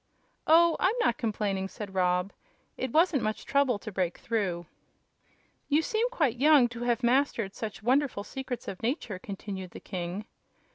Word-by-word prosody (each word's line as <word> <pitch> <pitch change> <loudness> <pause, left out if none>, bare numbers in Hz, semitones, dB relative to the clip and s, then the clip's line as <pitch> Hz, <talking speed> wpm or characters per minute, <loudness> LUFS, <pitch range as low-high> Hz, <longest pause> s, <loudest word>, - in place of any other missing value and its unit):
"Oh, 335 +1 +6
I'm 390 +5 +2
not 240 - +1
complaining," 200 -4 -1
said 200 -1 -8
Rob. 180 +1 +1 0.4
"It 260 - -3
wasn't 320 -2 +3
much 215 0 -2
trouble 280 -5 +2
to 215 +1 -8
break 180 -3 -1
through." 190 -7 -2 1.0
"You 305 +2 +3
seem 450 +6 0
quite 295 - 0
young 285 -2 +6
to 235 0 -8
have 240 0 0
mastered 240 -5 +2
such 215 +1 -6
wonderful 255 -3 +1
secrets 265 +1 -6
of 190 - -6
Nature," 230 - -2
continued 195 -1 -6
the - - -10
king. 185 +2 -5
230 Hz, 155 wpm, -29 LUFS, 195-280 Hz, 1.0 s, Oh